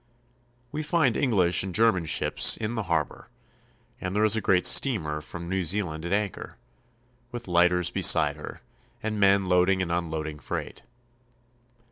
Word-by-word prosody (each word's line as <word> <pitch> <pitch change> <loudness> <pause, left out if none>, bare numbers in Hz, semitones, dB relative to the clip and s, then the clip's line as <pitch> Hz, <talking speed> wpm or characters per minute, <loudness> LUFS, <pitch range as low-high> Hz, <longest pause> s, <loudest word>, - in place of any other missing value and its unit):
We 150 - -4
find 155 -5 +1
English 95 -9 +2
and 95 -2 -6
German 110 -7 +2
ships 80 - +2
in 110 +2 -4
the 115 - -3
harbor, 80 -3 -3 0.7
and 90 +1 -4
there 105 - +1
is 110 0 +4
a 110 - -1
great 90 -3 +1
steamer 80 - +2
from 85 +3 -9
New 95 +1 -2
Zealand 85 -3 -3
at - - -6
anchor, 100 -1 -3 0.7
with 120 -2 -8
lighters 90 0 +2
beside 80 -6 +3
her, 75 - -10 0.4
and 110 -1 -3
men 100 -1 +3
loading 90 +1 +2
and 90 -2 -3
unloading 80 -3 -4
freight. - - -6
90 Hz, 150 wpm, -25 LUFS, 85-105 Hz, 0.7 s, is